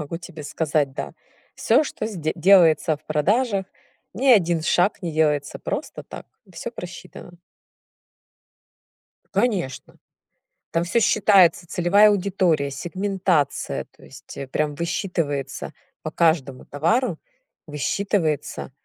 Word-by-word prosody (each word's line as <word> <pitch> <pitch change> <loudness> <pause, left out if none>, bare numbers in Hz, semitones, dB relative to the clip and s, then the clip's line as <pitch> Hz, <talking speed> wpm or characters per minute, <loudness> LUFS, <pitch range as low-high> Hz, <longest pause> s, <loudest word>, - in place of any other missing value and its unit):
могу 150 +3 -5
тебе 160 -3 -10
сказать, 145 -2 -1
да. - - -5 0.4
Всё, - - +3
что 215 -6 -4
сде 165 -8 -3
делается 165 -4 +5
в 155 - -28
продажах, 195 - 0 0.5
ни 260 +7 -2
1 175 -8 +4
шаг 180 +5 +1
не 170 -2 -3
делается 150 -2 0
просто - - -5
так. - - -10 0.3
Всё - - -6
просчитано. 175 -1 -10 2.0
Конечно. 195 - -1 0.8
Там 165 - 0
всё 175 +7 +1
считается: 190 -6 +4
целевая 190 +5 +4
аудитория, 180 -7 +1
сегментация,- 180 0 -1
то - - -22
есть, - - -13
э, 135 - -6
прям 150 +1 -2
высчитывается 165 -4 -3 0.3
по - - -5
каждому 150 -6 0
товару. 170 - 0 0.5
Высчитывается 155 0 -2
170 Hz, 110 wpm, -23 LUFS, 150-195 Hz, 2.0 s, делается